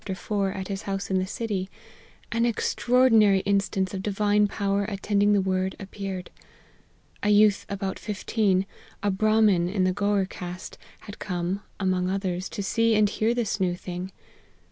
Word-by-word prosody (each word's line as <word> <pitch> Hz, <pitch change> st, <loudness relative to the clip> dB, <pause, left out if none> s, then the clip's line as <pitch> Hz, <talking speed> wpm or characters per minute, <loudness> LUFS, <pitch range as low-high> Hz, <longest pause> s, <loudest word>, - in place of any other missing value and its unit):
at 190 Hz, -1 st, -5 dB
his 195 Hz, -1 st, -4 dB
house 195 Hz, 0 st, -3 dB
in 190 Hz, -, +2 dB
the 185 Hz, -, -2 dB
city, 200 Hz, -3 st, -3 dB, 0.6 s
an 230 Hz, 0 st, +1 dB
extraordinary 230 Hz, -3 st, +3 dB
instance 195 Hz, -1 st, 0 dB
of 190 Hz, -, -3 dB
Divine 205 Hz, +1 st, +2 dB
power 200 Hz, 0 st, 0 dB
attend 200 Hz, 0 st, -1 dB
ing 205 Hz, 0 st, +4 dB
the 200 Hz, -, +3 dB
Word, 190 Hz, 0 st, -1 dB
appeared. 195 Hz, -2 st, -6 dB, 0.9 s
A 205 Hz, -, +1 dB
youth 210 Hz, -1 st, +4 dB
about 195 Hz, -1 st, -3 dB
fifteen, 205 Hz, -2 st, 0 dB, 0.4 s
a 205 Hz, -, +2 dB
Brahmin 210 Hz, -3 st, +3 dB
of 190 Hz, -1 st, 0 dB
the 185 Hz, 0 st, +2 dB
Gour 200 Hz, 0 st, +1 dB
caste, 180 Hz, -1 st, -8 dB, 0.2 s
had 205 Hz, +2 st, -10 dB
come, 180 Hz, +1 st, -2 dB, 0.2 s
among 185 Hz, -1 st, 0 dB
others, 185 Hz, -1 st, -2 dB
to 200 Hz, -, -4 dB
see 230 Hz, +2 st, +2 dB
and 210 Hz, -1 st, +4 dB
hear 225 Hz, +3 st, +1 dB
this 225 Hz, -4 st, -1 dB
new 180 Hz, -2 st, +1 dB
thing. 180 Hz, +1 st, -6 dB
195 Hz, 155 wpm, -26 LUFS, 190-210 Hz, 0.9 s, ing